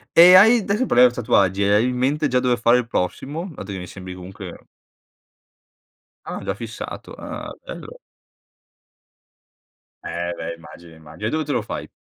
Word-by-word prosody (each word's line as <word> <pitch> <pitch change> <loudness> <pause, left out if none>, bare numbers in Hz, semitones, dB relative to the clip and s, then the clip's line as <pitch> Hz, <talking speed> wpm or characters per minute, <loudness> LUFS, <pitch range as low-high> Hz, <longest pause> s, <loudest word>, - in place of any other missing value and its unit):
e 180 +2 +9
hai 225 +6 +8
ades 210 +5 -1
parliamo 125 0 +5
tatuaggi, 100 -5 +1
e 100 +1 +3
hai 110 +4 +3
in 125 - -3
mente 145 +4 +1
già 125 -1 +1
dove 125 -1 +1
fare 120 +1 +4
il 120 -2 -2
prossimo, 150 - -3
dato 100 - -8
che 95 - -5
mi 90 -1 -7
sembri 90 0 -9
comunque 95 0 -10 1.6
Ah, - - -5
già 95 - -3
fissato. 115 0 -8
Ah, - - -7
bello. - - -9 2.1
Eh, 85 0 -4
beh, 85 +1 -5
immagino, 85 0 -14
immagino, 80 +7 -7
e - - 0
dove 155 0 -1
te 145 - -3
lo 120 - 0
fai? 105 - -7
115 Hz, 165 wpm, -21 LUFS, 95-140 Hz, 2.1 s, e